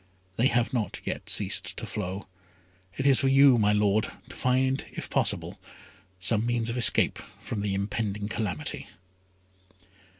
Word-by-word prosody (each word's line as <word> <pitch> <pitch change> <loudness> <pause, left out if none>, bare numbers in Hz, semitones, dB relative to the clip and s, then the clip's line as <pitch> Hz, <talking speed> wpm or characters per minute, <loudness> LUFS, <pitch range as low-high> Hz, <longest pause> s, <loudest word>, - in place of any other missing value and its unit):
They 120 +6 +3
have 120 -1 0
not 115 -5 -2
yet - - -5
ceased - - +1
to - - -4
flow. 95 -1 -5 0.7
It 135 - -2
is 135 -2 +7
for 135 - +2
you, 135 -2 +6
my 105 -1 +3
Lord, 105 0 +1 0.2
to - - -10
find, 130 +1 +1
if - - -7
possible, - - -1 0.6
some 110 +3 +1
means 120 -1 -1
of 120 - -4
escape 120 - +4 0.2
from 100 - -4
the 100 -1 -1
impending 100 +1 -3
calamity." 105 -8 -3
110 Hz, 145 wpm, -27 LUFS, 100-125 Hz, 0.7 s, is